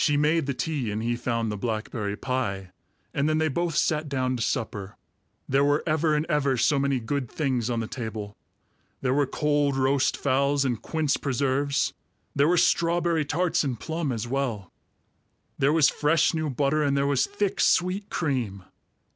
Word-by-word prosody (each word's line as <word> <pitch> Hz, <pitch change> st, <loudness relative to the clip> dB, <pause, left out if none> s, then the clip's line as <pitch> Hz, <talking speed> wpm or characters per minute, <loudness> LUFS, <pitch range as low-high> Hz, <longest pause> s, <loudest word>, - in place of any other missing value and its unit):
She 145 Hz, -2 st, +3 dB
made 150 Hz, 0 st, +2 dB
the 140 Hz, -, -1 dB
tea, 145 Hz, -6 st, -2 dB
and 105 Hz, +2 st, -3 dB
he 120 Hz, +1 st, 0 dB
found 115 Hz, -2 st, -2 dB
the 105 Hz, -, -4 dB
blackberry 110 Hz, -1 st, -3 dB
pie, 100 Hz, -8 st, -3 dB, 0.4 s
and 140 Hz, +2 st, +1 dB
then 155 Hz, -, +2 dB
they 155 Hz, 0 st, +1 dB
both 170 Hz, +2 st, -1 dB
sat 150 Hz, -1 st, +1 dB
down 130 Hz, -2 st, 0 dB
to 120 Hz, -, -4 dB
supper. 105 Hz, -4 st, -3 dB, 0.5 s
There 135 Hz, +1 st, +3 dB
were 145 Hz, +1 st, +2 dB
ever 155 Hz, -1 st, +2 dB
and 150 Hz, +1 st, 0 dB
ever 140 Hz, -5 st, +1 dB
so 140 Hz, +4 st, +3 dB
many 135 Hz, -1 st, +1 dB
good 130 Hz, +1 st, -3 dB
things 130 Hz, -6 st, -1 dB
on 115 Hz, -1 st, -1 dB
the 110 Hz, -, -4 dB
table. 110 Hz, -4 st, -6 dB, 0.7 s
There 130 Hz, -1 st, +1 dB
were 145 Hz, 0 st, +2 dB
cold 145 Hz, -1 st, +1 dB
roast 135 Hz, +1 st, +2 dB
fowls 140 Hz, +1 st, +1 dB
and 120 Hz, -4 st, -1 dB
quince 155 Hz, -3 st, 0 dB
preserves; 140 Hz, +1 st, 0 dB, 0.4 s
there 140 Hz, +1 st, +4 dB
were 175 Hz, +2 st, +3 dB
strawberry 170 Hz, -1 st, +2 dB
tarts 165 Hz, +4 st, +1 dB
and 130 Hz, -6 st, -3 dB
plum 160 Hz, -3 st, -2 dB
as 115 Hz, -1 st, -3 dB
well; 120 Hz, -8 st, -2 dB, 0.9 s
there 135 Hz, -, +3 dB
was 155 Hz, -2 st, +5 dB
fresh 155 Hz, +3 st, +2 dB
new 155 Hz, -2 st, -1 dB
butter, 140 Hz, +3 st, +1 dB
and 140 Hz, -1 st, +1 dB
there 140 Hz, -, +2 dB
was 140 Hz, -2 st, +2 dB
thick 205 Hz, -1 st, -2 dB
sweet 190 Hz, +3 st, +2 dB
cream. 120 Hz, -, -2 dB
140 Hz, 180 wpm, -26 LUFS, 120-155 Hz, 0.9 s, was